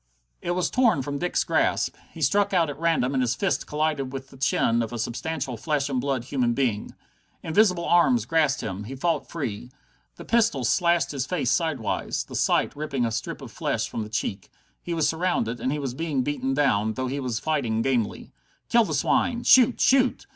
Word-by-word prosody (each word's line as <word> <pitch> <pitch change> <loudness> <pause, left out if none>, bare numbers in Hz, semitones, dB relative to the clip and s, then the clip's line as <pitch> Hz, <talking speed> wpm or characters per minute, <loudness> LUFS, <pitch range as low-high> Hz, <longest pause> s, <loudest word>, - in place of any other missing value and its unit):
It 175 - -2
was 180 - 0
torn 235 - +3
from 140 +1 -4
Dick's 180 0 0
grasp. - - +1 0.2
He - - -5
struck 200 -1 +2
out 165 -4 +2
at 145 - -10
random, 160 -6 +1
and 130 - +1
his 125 -1 +1
fist 190 +8 -1
collided 150 -3 -1
with 135 0 -7
the 135 - -14
chin 120 -3 +2
of 115 -1 -3
a 120 - -4
substantial 130 +3 -3
flesh 145 +2 -1
and 130 -2 -1
blood 135 -2 -1
human 125 -2 0
being. 115 -6 -1 0.5
Invisible 180 0 +2
arms 130 -11 +3
grasped 150 0 +1
him. 105 -1 -5
He 130 +5 -7
fought 165 +5 -1
free. 125 -7 -5 0.5
The - - -11
pistol 225 - +2
slashed 170 +7 +2
his 135 -2 -3
face 155 -9 0
sidewise, 160 - -1
the - - -10
sight - - +1
ripping 140 -4 -2
a 115 - -1
strip 110 - -4
of - - -9
flesh - - -2
from - - -4
the 105 - -6
cheek. 105 -3 -3 0.3
He 170 - -4
was 160 -2 +2
surrounded, 160 -8 -1
he 150 - -1
was 135 -4 -3
being 145 -2 -1
beaten 135 -1 -2
down, 110 -7 +2
though 130 - -2
he 135 +3 -3
was 125 -4 -2
fighting 120 -6 -1
gamely. 125 -5 -1 0.4
"Kill 235 -1 +4
the - - -2
swine! 245 -2 +1
Shoot! 250 -1 +6
Shoot!" 260 -1 +3
140 Hz, 200 wpm, -25 LUFS, 125-170 Hz, 0.5 s, Shoot